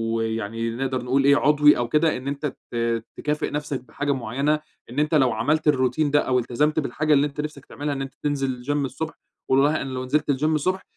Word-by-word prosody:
ويعني 115 0 -2
نقدر 130 0 -2
نقول 130 +2 +1
إيه، 140 +1 +6
عضوي 150 0 +5
أو 120 -1 -1
كده 155 +4 +2
إن 130 +2 -8
أنت 140 +2 -3 0.3
ت 115 -1 -1
تكافئ 150 +1 -1
نفسك 145 -3 -3
بحاجة 145 +3 -3
معيّنة، 135 +5 0 0.3
إن 130 +5 -3
أنت 155 +1 +2
لو 130 -4 +4
عملت 150 +8 0
الروتين 140 +1 +2
ده 145 - +5
أو 125 -1 +1
التزمت 150 +6 0
بالحاجة 150 +2 0
اللي 145 +1 +4
أنت 145 +1 -5
نفسك 150 -2 -7
تعملها 145 0 -4
إن 135 - -4
أنت 135 +1 -6
تنزل 135 -4 -1
جيم 145 +2 -1
الصبح 160 +4 -5 0.4
والله 140 +4 +3
أنا 135 - -4
لو 130 0 -4
نزلت 150 +3 0
الجيم 155 +3 +2
الصبح 185 +5 0
140 Hz, 210 wpm, -24 LUFS, 125-150 Hz, 0.4 s, إيه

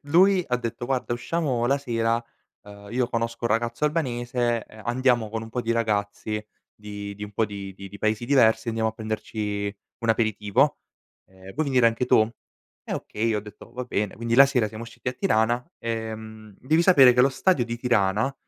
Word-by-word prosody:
lui 190 +2 +5
ha 125 - +2
detto: 120 0 -5
"Guarda, 130 -2 -1
usciamo 130 -2 -1
la 135 +3 +3
sera, 115 -3 -1 0.4
ehm, 100 0 -12
io 125 0 +1
conosco 115 0 -2
un - - +2
ragazzo 115 +6 0
albanese, 120 -6 0
ehm, 110 - -14
andiamo 120 -2 +2
con 110 +1 -4
un 115 - -9
po' 125 - -2
di 115 -1 -3
ragazzi 105 -1 -1 0.3
di 105 -1 -7
di 105 +1 -6
un 105 - -10
po' 110 - +1
di 100 -2 -7
di 100 0 -10
di 100 - -10
paesi 110 +2 0
diversi, 115 -4 +3
andiamo 110 -1 0
a - - -4
prenderci 105 -2 -4 0.2
un 115 - -4
aperitivo, 110 +4 +2 0.5
ehm, 95 0 -13
vuoi 155 +6 -1
venire 130 -4 +4
anche 115 +2 +1
tu?" 110 -3 +5 0.6
Eh - - -3
okay, 110 +2 -3
io 110 - +1
ho - - -3
detto: 105 0 -13
"Va 125 - -4
bene." 105 -4 -2
Quindi 115 +1 -1
la 135 +3 +9
sera 125 -5 +1
siamo 110 +2 -7
usciti 120 +1 -6
a 125 - -2
Tirana. 120 - +1 0.2
Ehm, 110 -2 -6
devi 155 +6 +2
sapere 140 -9 +7
che 125 - +3
lo 130 - +6
stadio 135 -1 +1
di 120 0 -3
Tirana 115 +1 +1
115 Hz, 200 wpm, -25 LUFS, 110-125 Hz, 0.6 s, la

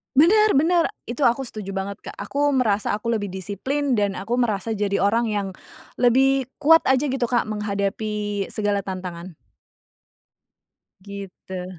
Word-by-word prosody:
Bener, 415 +9 +5
bener. 330 +4 +3 0.2
Itu 250 +3 0
aku 240 +3 +3
setuju 215 -6 -6
banget, 195 +1 -4
Kak, - - -7
aku 290 +1 -1
merasa 215 -7 +1
aku 215 +3 -3
lebih 205 -3 -5
disiplin 245 +8 -2
dan 205 -1 +1
aku 230 +6 -3
merasa 225 -3 0
jadi 205 -2 0
orang 225 +4 +2
yang 205 -3 -1 0.5
lebih 265 +2 +3 0.2
kuat 325 +3 +6
aja 265 +2 +2
gitu, 260 -2 0
Kak, 240 -2 0
menghadapi 205 0 -2
segala 205 -2 -1
tantangan. 185 -2 -6 1.7
Gitu. 190 -2 -8
215 Hz, 135 wpm, -23 LUFS, 200-265 Hz, 1.7 s, kuat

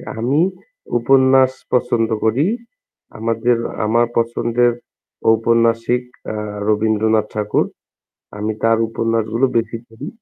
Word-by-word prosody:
এ - - -12 0.2
আমি 135 +7 +1 0.6
উপন্যাস 130 +1 +4 0.2
পছন্দ 120 -2 +1 0.2
করি। 125 +9 +2 0.7
আমাদের 115 +2 +1 0.3
আমার 115 +2 +2
পছন্দের 120 +1 +1 0.6
ঔপন্যাসিক 115 +2 +2 0.2
অ্যাঁ 105 -1 -4 0.2
রবীন্দ্রনাথ 110 0 +2
ঠাকুর। 105 -1 0 0.7
আমি 105 +1 -2
তার 115 0 +4
উপন্যাসগুলো 115 +2 0
বেশি 115 0 -1
পড়ি। 115 +7 -10
115 Hz, 100 wpm, -18 LUFS, 110-120 Hz, 0.7 s, উপন্যাস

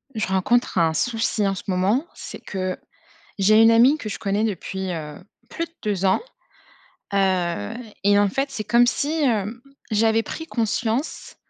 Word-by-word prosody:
Je 215 - -1
rencontre 190 +5 +1
un 165 -2 +3
souci 225 +2 0
en 195 0 0
ce - - -7
moment, 200 - +1
c'est - - -8
que, 185 -1 -4 0.6
j'ai 215 +3 +5
une 225 - +7
amie 245 +6 +6
que 225 - -6
je 195 - -5
connais 200 +2 0
depuis, 190 -2 -3
heu, 150 -3 -6 0.3
plus 335 - -3
de 335 - -14
2 200 -3 -1
ans, 190 - +3 0.9
heu, 180 - 0 0.3
et 205 0 +5
en 205 0 +4
fait, 275 +7 -2
c'est 215 - -5
comme 235 +3 +4
si, 285 +4 0
hem, 230 -2 0 0.3
j'avais 225 +1 +3
pris 320 - -6
conscience, 230 +2 -2
210 Hz, 165 wpm, -23 LUFS, 190-235 Hz, 0.9 s, une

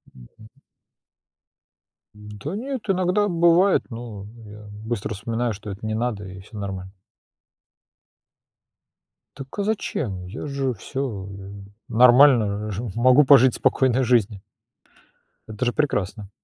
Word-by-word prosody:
Мгм. 65 - -16 1.7
Да 105 - -8
нет, 260 +3 -4
иногда 185 +2 +1
бывает, 175 +2 +3
но 115 -4 -8 0.2
я 105 0 -12 0.2
быстро 110 -2 -3
вспоминаю, 115 +3 -2
что 105 +1 -9
это 100 +2 -7
не 110 - -2
надо, 110 -3 -2
и 95 0 -10
всё 105 +3 -13
нормально. 95 -2 -6 2.4
Так 135 -1 -8
а - - +1
зачем? 135 - -3
Я 110 +11 -7
же 135 -2 -2
всё 110 -3 -5 0.6
нормально, 120 -4 +5
жив 105 0 -5
могу 130 +4 +5
пожить 130 -2 +6
спокойной 130 0 +2
жизнью. 110 -5 +1 1.1
Это 110 +3 -4
же 120 - 0
прекрасно. 105 -8 -2
115 Hz, 115 wpm, -23 LUFS, 105-135 Hz, 2.4 s, пожить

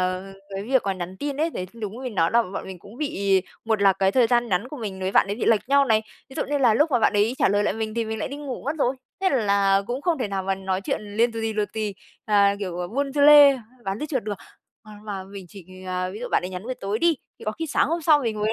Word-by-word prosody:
ờ, 185 0 -1 0.3
cái 195 - -3
việc 260 +4 +2
mà 195 - 0
nhắn 185 0 -6
tin 285 +4 -4
ấy, 320 +3 0
đấy, 185 - -5
đúng 220 -2 -6
mình 250 -4 -5
nói 165 -3 +2
là 235 0 +5
bọn 195 -3 -6
mình 190 -1 -8
cũng 200 +6 -14
bị 200 -10 +1 0.2
một 220 -2 0
là 195 -1 +6
cái 190 0 +1
thời 250 0 +4
gian 240 0 +2
nhắn 195 +5 0
của 300 - -8
mình 205 -6 -6
với 185 0 -1
bạn - - +5
ấy 200 - -2
bị - - -2
lệch 225 +1 +2
nhau 280 0 +5
này, 220 -4 +2 0.3
ví - - -11
dụ - - 0
như 290 +1 0
là 245 -5 +4
lúc 300 +7 +3
mà 250 - +3
bạn 225 - +3
đấy 210 +3 +2
trả - - +4
lời 205 +1 +2
lại - - 0
mình 220 -1 -4
thì 230 -1 0
mình 220 0 -4
lại - - -3
đi 280 - -6
ngủ 285 -3 -6
mất 290 +4 -2
rồi, 265 -1 +1 0.2
thế 385 - +3
là 200 -5 +2
cũng 250 +4 -4
không 340 -2 +1
thể 245 - -2
nào 195 -1 -2
mà 195 +1 0
nói 190 0 -2
chuyện 195 - -2 0.2
liên 235 +1 +3
tù 225 - -5
tì, 225 0 -1
tù 215 0 0
tì, 215 -2 -3 0.3
à, 200 -2 +4
kiểu, 180 -3 -4
buôn 280 0 -1
dưa 290 - -1
lê, 290 -1 +8 0.3
bán 195 +1 -3
dưa 300 - -2
chuột 265 -5 -2
được. 210 0 -3 0.5
À, 215 -2 -14
mà 200 -3 -5
mình 195 0 -10
chỉ, 195 0 -12 0.2
à, 185 0 -2
ví 200 - -8
dụ 245 - -4
bạn - - +2
đấy 180 - -5
nhắn 180 0 -6
buổi 255 +2 -3
tối 200 -1 -3
đi, 335 -1 +3 0.2
thì - - -11
có 215 - -1
khi 325 +8 -5
sáng 285 - +1
hôm 335 +2 -1
sau 305 -1 +5
mình 225 -6 -2
mới 215 +1 +1
215 Hz, 305 wpm, -24 LUFS, 195-260 Hz, 0.5 s, lê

